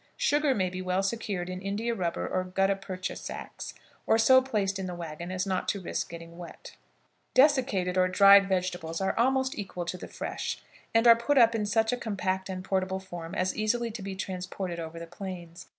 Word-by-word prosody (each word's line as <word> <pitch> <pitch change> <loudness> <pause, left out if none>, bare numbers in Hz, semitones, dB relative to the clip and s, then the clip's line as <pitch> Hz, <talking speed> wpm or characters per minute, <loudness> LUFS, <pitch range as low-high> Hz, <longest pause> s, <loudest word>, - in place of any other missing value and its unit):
Sugar 295 - +2
may 185 -2 0
be 185 0 -5
well 185 +1 0
secured 195 -4 -2
in 185 0 -5
India 210 +4 -2
rubber 175 -6 -2
or 185 - -1
gutta 195 +2 +1
percha 190 -1 -5
sacks, - - -7 0.3
or 220 - +5
so 260 +3 +6
placed 205 -7 -1
in 190 - -3
the 180 - -5
wagon 170 +1 -6
as 185 +1 -1
not 190 -1 -1
to 200 - 0
risk 180 - -3
getting 170 0 -10
wet. 175 - -10 0.6
Desiccated 255 -10 +3
or 185 - +4
dried 200 +1 +7
vegetables 180 -3 -1
are 190 0 0
almost 265 +2 +2
equal 180 -3 -5
to 180 - -4
the - - -7
fresh, - - -4 0.3
and 225 +1 +3
are 235 -1 +9
put 235 +5 0
up 230 -2 +7
in 215 -2 -1
such 220 +2 +2
a - - 0
compact 190 -4 -2
and 185 -1 -4
portable 190 0 -1
form 175 -3 -8
as 185 +1 0
easily 230 +2 0
to 220 -1 -7
be 195 0 -5
transported 185 -1 -4
over 165 0 -6
the 170 - -6
plains. 175 -1 -8
190 Hz, 200 wpm, -28 LUFS, 180-220 Hz, 0.6 s, are